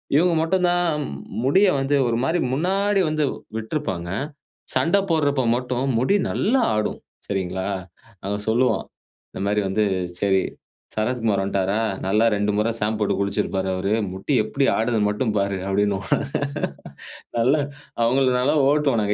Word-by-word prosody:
இவங்க 170 Hz, +4 st, +4 dB
மட்டும் 180 Hz, +2 st, +2 dB
தான் 175 Hz, 0 st, +2 dB, 0.6 s
முடிய 190 Hz, +10 st, +5 dB
வந்து 135 Hz, +2 st, +1 dB
ஒரு 115 Hz, -1 st, 0 dB
மாரி 170 Hz, +4 st, +1 dB
முன்னாடி 195 Hz, +6 st, +1 dB
வந்து 155 Hz, 0 st, 0 dB, 0.3 s
விட்டிருப்பாங்க. 110 Hz, -, -3 dB, 0.7 s
சண்ட 170 Hz, +4 st, +3 dB
போடுறப்ப 145 Hz, -4 st, +2 dB, 0.2 s
மட்டும் 125 Hz, +1 st, -2 dB
முடி 130 Hz, +11 st, +2 dB
நல்லா 250 Hz, +5 st, +2 dB
ஆடும், 105 Hz, 0 st, -2 dB, 0.3 s
சரிங்களா. 95 Hz, -1 st, -2 dB, 0.6 s
அவன் 100 Hz, +1 st, -3 dB
சொல்லுவான். 125 Hz, +3 st, +2 dB, 0.5 s
இந்த -, -, -8 dB
மாரி 105 Hz, +1 st, +2 dB
வந்து 105 Hz, +3 st, +1 dB, 0.4 s
சரி, 95 Hz, -2 st, +3 dB, 0.5 s
சரத்குமார் 110 Hz, -2 st, 0 dB
வந்துட்டாரா? 100 Hz, +2 st, 0 dB, 0.2 s
நல்லா 105 Hz, +4 st, +3 dB
2 105 Hz, +1 st, 0 dB
முறை 105 Hz, +2 st, +2 dB
சாம்ப் 110 Hz, +1 st, 0 dB
போட்டு 105 Hz, -, +1 dB
குளிச்சிருப்பாரு 100 Hz, -1 st, -1 dB
அவரு. 95 Hz, +2 st, -1 dB, 0.2 s
முடி 95 Hz, +10 st, -3 dB
எப்டி 135 Hz, +5 st, 0 dB
ஆடுதுன்னு 110 Hz, -2 st, +1 dB
மட்டும் 105 Hz, +2 st, -1 dB
பாரு 100 Hz, -1 st, 0 dB
அப்படின்னுவோம். 100 Hz, 0 st, 0 dB, 2.0 s
அவங்கள 130 Hz, +4 st, +3 dB
நல்லா 140 Hz, +5 st, +2 dB
ஓட்டுவோம் 145 Hz, -5 st, +2 dB
நாங்க. 105 Hz, 0 st, +1 dB
115 Hz, 130 wpm, -23 LUFS, 100-145 Hz, 2.0 s, முடிய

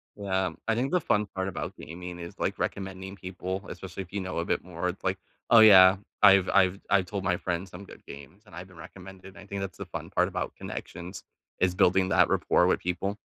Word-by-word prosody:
Yeah. 95 Hz, -2 st, -1 dB, 0.2 s
I 115 Hz, -, +2 dB
think 130 Hz, +5 st, -1 dB
the 180 Hz, -, +2 dB
fun 105 Hz, 0 st, +1 dB
part 95 Hz, -1 st, -4 dB
about 95 Hz, -, -5 dB
gaming 90 Hz, +2 st, -8 dB
is, 85 Hz, 0 st, -9 dB
like, -, -, -2 dB
recommending 95 Hz, 0 st, -4 dB
people, 95 Hz, +1 st, -6 dB
especially 95 Hz, 0 st, -7 dB
if 90 Hz, -, -20 dB
you 100 Hz, -, -2 dB
know 95 Hz, 0 st, -5 dB
a 85 Hz, -, -2 dB
bit -, -, -1 dB
more. 90 Hz, 0 st, -4 dB
It's 90 Hz, -, -8 dB
like, 95 Hz, 0 st, 0 dB, 0.3 s
oh, 115 Hz, -, +8 dB
yeah. 95 Hz, -3 st, +8 dB, 0.2 s
I've 100 Hz, -2 st, +7 dB
I've 95 Hz, +1 st, +3 dB
I've 95 Hz, -2 st, +3 dB
told 100 Hz, 0 st, -5 dB
my 90 Hz, -1 st, +2 dB
friends 90 Hz, +1 st, -3 dB
some 90 Hz, +2 st, -10 dB
good -, -, -14 dB
games, 70 Hz, +9 st, -12 dB
and 105 Hz, -, -15 dB
I've 90 Hz, +1 st, -8 dB
been 90 Hz, -, -17 dB
recommended 95 Hz, +3 st, -12 dB
and -, -, -15 dB
I -, -, -15 dB
think 100 Hz, 0 st, -5 dB
that's 95 Hz, -2 st, -5 dB
the -, -, -6 dB
fun -, -, -7 dB
part -, -, +1 dB
about -, -, -4 dB
connections, 90 Hz, +2 st, -8 dB, 0.4 s
is 90 Hz, -1 st, +1 dB
building 95 Hz, +1 st, +3 dB
that -, -, +4 dB
rapport -, -, +2 dB
with -, -, +2 dB
people. 95 Hz, +3 st, -3 dB
95 Hz, 230 wpm, -27 LUFS, 90-100 Hz, 0.4 s, oh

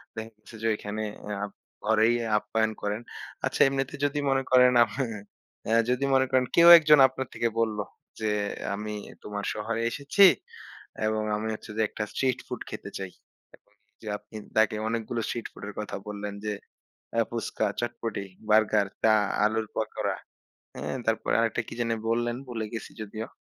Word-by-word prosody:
দেখা 110 Hz, 0 st, -6 dB
গেছে 115 Hz, -, -14 dB
যে 115 Hz, -, 0 dB
ওইখানে 105 Hz, 0 st, -4 dB, 0.4 s
আ -, -, +1 dB, 0.4 s
ঘরেই 110 Hz, +2 st, +4 dB, 0.2 s
আপ্যায়ন 110 Hz, +1 st, 0 dB
করেন। 105 Hz, +2 st, -2 dB, 0.4 s
আচ্ছা -, -, 0 dB
এমনিতে 135 Hz, 0 st, -1 dB
যদি 145 Hz, +1 st, 0 dB
মনে 135 Hz, 0 st, +2 dB
করেন। 125 Hz, 0 st, +7 dB, 0.9 s
অ্যাঁ 115 Hz, +1 st, +4 dB
যদি 125 Hz, +2 st, +1 dB
মনে 130 Hz, 0 st, +5 dB
করেন 130 Hz, -1 st, +3 dB
কেউ 170 Hz, 0 st, +7 dB
একজন 150 Hz, -2 st, +6 dB
আপনার 130 Hz, 0 st, -5 dB
থেকে 115 Hz, -, 0 dB
বললো 110 Hz, -2 st, 0 dB, 0.4 s
যে 110 Hz, -, 0 dB, 0.5 s
আমি 105 Hz, +1 st, -5 dB, 0.3 s
তোমার 105 Hz, -1 st, -4 dB
শহরে 110 Hz, +2 st, -2 dB
এসেছি 145 Hz, +10 st, +5 dB, 0.8 s
এবং 110 Hz, 0 st, 0 dB
আমি 110 Hz, +1 st, -3 dB
হচ্ছে 110 Hz, -, -8 dB
যে -, -, +2 dB
একটা 110 Hz, -, -4 dB
স্ট্রিট 130 Hz, -2 st, 0 dB
ফুড -, -, -5 dB
খেতে -, -, -7 dB
চাই। 95 Hz, -2 st, -5 dB, 0.4 s
এবং -, -, -37 dB, 0.3 s
যে 110 Hz, -, -10 dB
আপনি 110 Hz, -, -18 dB, 0.2 s
তাকে 110 Hz, 0 st, +4 dB
অনেকগুলো 115 Hz, +1 st, -2 dB
স্ট্রিট 120 Hz, -, -3 dB
ফুড -, -, -13 dB
এর -, -, -8 dB
কথা 105 Hz, -, -4 dB
বললেন 105 Hz, 0 st, -5 dB
যে 105 Hz, -, 0 dB, 0.7 s
আ -, -, +6 dB
ফুচকা, -, -, -1 dB
চটপটি, 115 Hz, -3 st, -3 dB, 0.3 s
বার্গার, 105 Hz, -1 st, +4 dB, 0.2 s
চা, 110 Hz, -1 st, +6 dB, 0.3 s
আলুর 110 Hz, 0 st, +1 dB
পাকোড়া -, -, -1 dB, 0.6 s
হ্যাঁ? -, -, -4 dB
তারপরে 110 Hz, 0 st, 0 dB
আরেকটা 115 Hz, 0 st, +1 dB
কি -, -, -7 dB
যেন 115 Hz, -1 st, 0 dB, 0.2 s
বললেন 120 Hz, +1 st, +1 dB
ভুলে 115 Hz, -3 st, -3 dB
গেছি 115 Hz, -, -6 dB
যদিও। 110 Hz, +2 st, -5 dB
110 Hz, 160 wpm, -27 LUFS, 105-120 Hz, 0.9 s, করেন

